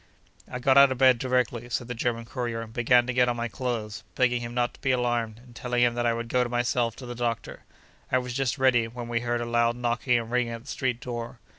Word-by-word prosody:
I - - -4
got 135 +2 +5
out 140 -1 +7
of 130 - -2
bed 130 -2 +5
directly 125 -2 0
(said 120 0 -2
the 125 - -3
German 115 -1 -2
courier) 120 -2 -3
and 110 0 -12
began 120 +1 +4
to 125 - -2
get 125 0 +3
on 120 - 0
my 120 0 -1
clothes, 115 -4 -4
begging 125 -1 +2
him 120 0 -6
not 120 0 0
to - - -19
be 135 - -1
alarmed, 120 -3 0
and 120 - -16
telling 125 0 0
him 120 -1 +3
that 120 0 0
I 115 - +2
would 115 0 -4
go 125 +1 +2
myself 120 -1 0
to 130 - -10
the 120 - -6
doctor. 120 -1 -4 0.5
I 130 - +4
was 125 -1 -3
just 135 0 -1
ready, 130 -4 +3
when 120 +1 -7
we 120 -1 0
heard 120 0 -1
a - - -2
loud 120 0 +2
knocking 120 +1 +1
and 115 0 -4
ringing 125 -1 0
at 115 - -7
the 130 - -20
street 130 -3 -2
door. 120 0 -5
120 Hz, 260 wpm, -26 LUFS, 120-125 Hz, 0.5 s, out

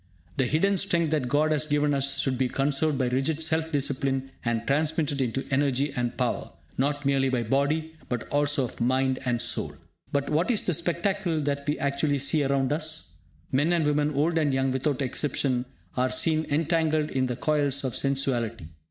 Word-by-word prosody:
The 135 - +3
hidden 195 +8 +2
strength 170 -5 +1
that 150 -5 0
God 150 +4 +2
has 155 0 +1
given 145 0 +2
us 140 0 0
should 135 -2 0
be 130 0 0
conserved 140 +2 +1
by 130 -2 +1
rigid 135 +5 0
self 160 0 0
discipline, 135 -2 -1
and 115 -2 -1
transmitted 150 0 +1
into 130 +1 -1
energy 140 0 +1
and 120 -2 -2
power, - - -2 0.2
not 145 +2 -1
merely 135 -1 +2
of 120 -4 -1
body, 155 +4 +1 0.2
but 120 -2 -3
also 145 -1 +2
of 120 - -8
mind 130 +2 +1
and 120 -2 +1
soul. - - -1 0.4
But 140 -1 0
what 160 +7 +1
is 230 -4 +1
the 180 - 0
spectacle 170 +1 0
that 140 0 -2
we 150 - +1
actually 140 +1 0
see 145 +2 +1
around 135 0 +1
us? 155 +1 -2 0.4
Men 145 +6 +2
and 170 -3 +2
women, 150 0 +2
old 165 +4 +2
and 150 -3 +2
young, 135 0 +1
without 135 +1 0
exception, 130 -1 0 0.3
are 130 0 +1
seen 155 +5 +1
entangled 155 0 +1
in 130 -1 +1
the 125 - -2
coils 145 -1 0
of 130 -4 -2
sensuality. 120 - -1
140 Hz, 185 wpm, -26 LUFS, 130-155 Hz, 0.4 s, The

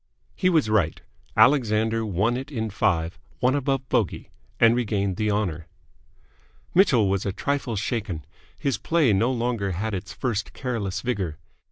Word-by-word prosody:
He 185 - +2
was 160 -9 +3
right. 105 -7 +1 0.4
Alexander 115 -4 +4
won 105 +3 +1
it 135 +4 -5
in 110 -5 -3
five, 90 -5 0 0.2
one 125 +1 +3
above 135 -1 0
bogey, 110 -8 -1 0.3
and 115 +1 +6
regained 100 -5 0
the 105 +3 0
honour. 95 -6 -1 1.1
Mitchell 135 - +5
was 95 0 0
a 100 - -1
trifle 140 +2 -2
shaken. 100 -7 -3 0.3
His 140 -4 -1
play 160 -9 +3
no 115 +6 +2
longer 115 -6 -1
had 105 +5 -3
its 95 0 -4
first 115 -5 -3
careless 115 -7 -3
vigour. 95 -11 -2
110 Hz, 150 wpm, -25 LUFS, 100-125 Hz, 1.1 s, and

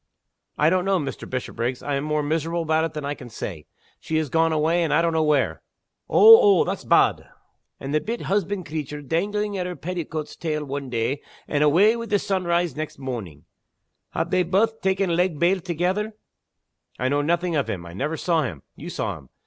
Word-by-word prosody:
"I 150 +2 +4
don't 185 -1 +2
know, 195 0 +2
Mr. 145 -5 -5
Bishopriggs. 125 -1 -3
I 145 - -2
am 140 0 -1
more 150 0 0
miserable 165 +3 -1
about 160 0 +2
it 165 - -5
than 150 -2 -5
I 145 - -1
can 130 -4 -11
say. 85 -8 -7 0.3
She 160 - -2
has 155 -2 -1
gone 165 +2 +2
away 160 +3 +2
and 165 - 0
I - - +4
don't 165 0 +1
know 160 - +2
where." 150 -3 +1 0.5
"Ow! 450 +2 +9
ow! 415 0 +5
that's - - -4
bad. - - +3 0.5
And 135 +1 -5
the 155 - +2
bit 235 +2 -4
husband 195 -1 -1
creature 150 -1 -5
danglin' 205 +7 -1
at 180 -1 -2
her 180 - -5
petticoat's 160 -3 -5
tail 155 -3 -3
one 140 -1 -5
day, 120 +4 -1 0.3
and 150 0 +1
awa' 195 +10 +5
wi' 230 - -5
the 205 - +2
sunrise 175 -3 0
next 155 0 -5
mornin' 115 - -6 0.6
have 170 - -3
they 185 - +3
baith 205 +6 +1
taken 190 -2 +1
leg 175 -2 +1
bail 180 +4 +2
together?" 185 +5 -2 0.8
"I 125 - 0
know 145 +2 +1
nothing 170 +3 0
of 140 -6 0
him; 90 -5 -4
I 85 - -10
never 145 - -2
saw 165 -1 +1
him. 90 - -5
You - - -8
saw - - -3
him. - - -19
160 Hz, 205 wpm, -24 LUFS, 145-185 Hz, 0.8 s, Ow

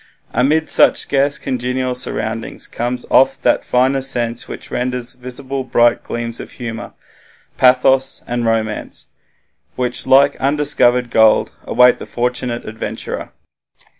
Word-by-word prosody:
Amid 150 +6 +2
such - - +5
scarce 140 +1 +1
congenial 125 0 -2
surroundings 115 -2 -3
comes 120 +1 -4
oft 135 0 +3
that - - +2
finer 130 +2 +1
sense 120 -3 -3
which - - -9
renders 125 -1 -3
visible 130 +2 -6
bright 120 -1 +2
gleams 115 0 -5
of - - -9
humour, 115 -1 -7 0.7
pathos, 130 +1 +3
and 120 0 -2
romance, 110 -1 -2 0.7
which, 125 0 -2
like 140 +2 +5
undiscovered 130 -3 +2
gold, 110 -2 +4 0.2
await 125 0 +4
the - - -8
fortunate 125 0 -2
adventurer. 110 +1 -6
125 Hz, 120 wpm, -17 LUFS, 120-135 Hz, 0.7 s, such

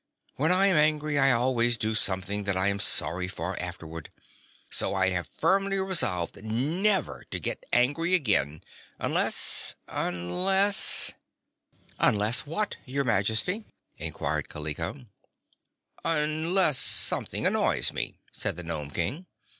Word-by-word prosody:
"When 155 +5 0
I 185 +2 +5
am 195 -2 +4
angry 150 -1 +2
I 135 0 +4
always 120 -1 +1
do 110 +1 -2
something 100 -1 0
that 100 -2 -1
I 95 +2 +2
am 100 0 -2
sorry 90 -2 +3
for 90 -1 -5
afterward. 85 -3 -8 0.6
So - - +1
I 95 0 +1
have 90 -3 -3
firmly 195 0 0
resolved 145 - -1
never 160 - 0
to - - -5
get - - -4
angry 155 +9 +2
again; 105 - 0 0.3
unless - - 0
unless 190 - +1 0.4
" - - -33
"Unless 110 +6 0
what, 210 +8 -3
your 140 +1 -3
Majesty?" 115 - 0 0.3
inquired - - -4
Kaliko. 80 - -6 1.0
"Unless 155 0 +2
something - - +3
annoys - - +2
me," - - -4 0.2
said - - -2
the 90 - -6
Nome 80 -4 -6
King. 125 - -4
120 Hz, 125 wpm, -26 LUFS, -, 1.0 s, I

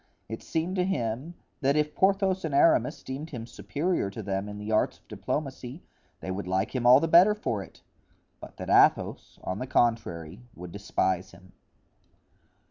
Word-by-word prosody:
It 110 - -6
seemed 165 +4 -2
to 180 - +2
him 135 -2 -2 0.3
that 140 +1 +2
if 150 0 +1
Porthos 190 -1 +2
and 155 -4 -2
Aramis 125 -5 +3
deemed 140 +5 -6
him 120 -6 -6
superior 150 - -2
to 105 +2 -7
them 100 +1 -3
in 105 - -7
the 105 +1 -5
arts 110 - +1
of - - -34
diplomacy, 135 0 -5 0.4
they 95 - -4
would 95 0 -4
like 95 +1 -1
him 120 -1 +1
all 125 +2 +9
the 165 - 0
better 180 +6 +6
for 115 - -2
it; - - -14 0.6
but - - -12
that - - -6
Athos, - - +3
on 95 +2 -3
the 130 - -4
contrary, 105 -7 0
would 90 0 -9
despise 95 -2 -1
him. 95 -1 -17
120 Hz, 175 wpm, -27 LUFS, 100-160 Hz, 0.6 s, all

